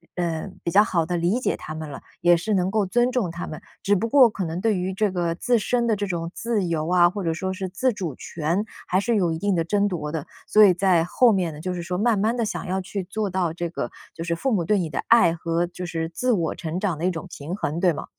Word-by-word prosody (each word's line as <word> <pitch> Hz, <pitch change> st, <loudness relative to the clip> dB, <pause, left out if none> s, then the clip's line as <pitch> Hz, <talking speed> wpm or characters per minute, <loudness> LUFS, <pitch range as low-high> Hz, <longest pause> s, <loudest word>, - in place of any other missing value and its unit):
呃， 170 Hz, -2 st, -2 dB, 0.2 s
比 -, -, -1 dB
较 205 Hz, +3 st, +6 dB
好 175 Hz, -7 st, 0 dB
地 175 Hz, +1 st, -1 dB
理 175 Hz, +8 st, +1 dB
解 -, -, -1 dB
他 155 Hz, -, -7 dB
们 155 Hz, -1 st, -6 dB
了， 140 Hz, -, -8 dB, 0.2 s
也 175 Hz, 0 st, +5 dB
是 215 Hz, +5 st, -2 dB
能 185 Hz, -2 st, +2 dB
够 210 Hz, 0 st, +1 dB
尊 240 Hz, +6 st, +2 dB
重 235 Hz, -10 st, 0 dB
他 170 Hz, +1 st, -6 dB
们。 155 Hz, -, -7 dB, 0.2 s
只 205 Hz, -, +2 dB
不 210 Hz, +4 st, 0 dB
过 255 Hz, 0 st, +6 dB
可 200 Hz, -3 st, -4 dB
能 165 Hz, +2 st, -4 dB
对 220 Hz, -2 st, +2 dB
于 185 Hz, +1 st, -2 dB
这 205 Hz, +1 st, +1 dB
个 175 Hz, -2 st, -1 dB
自 240 Hz, +7 st, +2 dB
身 235 Hz, +2 st, 0 dB
的 220 Hz, -, +3 dB
这 205 Hz, 0 st, -2 dB
种 170 Hz, -2 st, -3 dB
自 230 Hz, -4 st, -1 dB
由 160 Hz, -2 st, -1 dB
啊， 175 Hz, -1 st, +5 dB
或 200 Hz, +2 st, -5 dB
者 165 Hz, -2 st, 0 dB
说 190 Hz, +3 st, -3 dB
是 190 Hz, 0 st, -4 dB
自 225 Hz, +8 st, 0 dB
主 180 Hz, -8 st, -4 dB
权， 170 Hz, +8 st, -2 dB, 0.2 s
还 185 Hz, -, +2 dB
是 230 Hz, +3 st, +1 dB
有 180 Hz, -5 st, +2 dB
一 160 Hz, -, -3 dB
定 200 Hz, 0 st, +1 dB
的 165 Hz, -, +1 dB
争 205 Hz, +4 st, +1 dB
夺 155 Hz, -6 st, -3 dB
的。 155 Hz, -3 st, -4 dB, 0.2 s
所 215 Hz, -, +6 dB
以 195 Hz, -3 st, +7 dB
在 180 Hz, -2 st, +3 dB
后 230 Hz, +7 st, +4 dB
面 180 Hz, -4 st, 0 dB
呢， 150 Hz, -, -10 dB
就 185 Hz, +2 st, -3 dB
是 175 Hz, -, -4 dB
说 180 Hz, +1 st, -3 dB
慢 225 Hz, +2 st, +2 dB
慢 220 Hz, +4 st, +1 dB
地 230 Hz, -, +1 dB
想 -, -, -4 dB
要 190 Hz, +1 st, -1 dB
去 195 Hz, +1 st, -4 dB
做 200 Hz, +3 st, -3 dB
到 185 Hz, -3 st, 0 dB
这 170 Hz, 0 st, -3 dB
个 170 Hz, -, -4 dB, 0.2 s
就 165 Hz, -, -6 dB
是 170 Hz, 0 st, -1 dB
父 265 Hz, +10 st, -1 dB
母 185 Hz, -5 st, +1 dB
对 210 Hz, +4 st, +3 dB
你 175 Hz, -4 st, -1 dB
的 -, -, -4 dB
爱 205 Hz, -8 st, +6 dB
和 165 Hz, +1 st, -1 dB
就 180 Hz, +1 st, -7 dB
是 165 Hz, -2 st, -3 dB
自 250 Hz, +9 st, 0 dB
我 170 Hz, -7 st, +1 dB
成 165 Hz, +1 st, -4 dB
长 185 Hz, -5 st, -1 dB
的 165 Hz, -, -2 dB
一 185 Hz, -, +2 dB
种 165 Hz, -3 st, -6 dB
平 155 Hz, +6 st, -6 dB
衡， 165 Hz, -5 st, -2 dB
对 180 Hz, 0 st, +4 dB
吗？ -, -, -6 dB
180 Hz, 305 characters per minute, -24 LUFS, 170-205 Hz, 0.2 s, 以